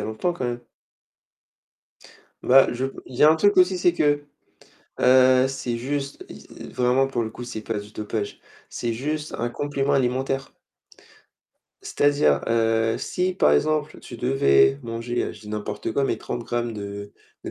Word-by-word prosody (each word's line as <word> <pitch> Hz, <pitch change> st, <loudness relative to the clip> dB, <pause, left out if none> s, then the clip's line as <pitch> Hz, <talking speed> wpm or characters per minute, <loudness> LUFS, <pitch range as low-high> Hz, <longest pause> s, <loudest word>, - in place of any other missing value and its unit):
a -, -, -3 dB
longtemps 110 Hz, +11 st, -2 dB
quand 170 Hz, -, -5 dB
même. 120 Hz, 0 st, -3 dB, 1.8 s
Bah, 135 Hz, +1 st, +6 dB
je 125 Hz, +2 st, -3 dB, 0.2 s
il 130 Hz, -, -11 dB
y -, -, +1 dB
a 155 Hz, -, +8 dB
un 160 Hz, -, +4 dB
truc 205 Hz, +5 st, +3 dB
aussi, 185 Hz, 0 st, +4 dB
c'est 175 Hz, -1 st, +3 dB
que, 145 Hz, -3 st, +1 dB, 0.8 s
heu, 130 Hz, 0 st, +5 dB
c'est 130 Hz, -3 st, -3 dB
juste, 140 Hz, +3 st, -4 dB
i -, -, -12 dB
e -, -, -8 dB
vraiment 125 Hz, +2 st, +2 dB
pour 120 Hz, -3 st, -1 dB
le 110 Hz, -, -4 dB
coup, 120 Hz, -, -10 dB
c'est 110 Hz, -3 st, -6 dB
pas 110 Hz, -1 st, -3 dB
du 105 Hz, 0 st, -9 dB
dopage. 105 Hz, -1 st, -4 dB, 0.3 s
C'est 120 Hz, -1 st, -3 dB
juste 150 Hz, +5 st, -4 dB
un 120 Hz, -, -2 dB
complément 145 Hz, +1 st, -2 dB
alimentaire. 135 Hz, +1 st, -1 dB, 1.3 s
C'est-à-dire, 145 Hz, -, +2 dB
heu, 115 Hz, -1 st, +1 dB
si 185 Hz, 0 st, -2 dB
par 75 Hz, -, +3 dB
exemple 150 Hz, -, 0 dB
tu 120 Hz, -, -10 dB
devais 120 Hz, -, +3 dB
manger, 115 Hz, +1 st, -3 dB
heu, -, -, -5 dB
je 105 Hz, -, -14 dB
dis 105 Hz, -, -11 dB
n'importe 105 Hz, +1 st, -4 dB
quoi, 140 Hz, -, +1 dB
mais -, -, 0 dB
30 120 Hz, -, -5 dB
grammes 120 Hz, 0 st, -2 dB
de 100 Hz, -1 st, -7 dB, 0.3 s
de -, -, -5 dB
125 Hz, 170 wpm, -23 LUFS, 115-140 Hz, 1.8 s, a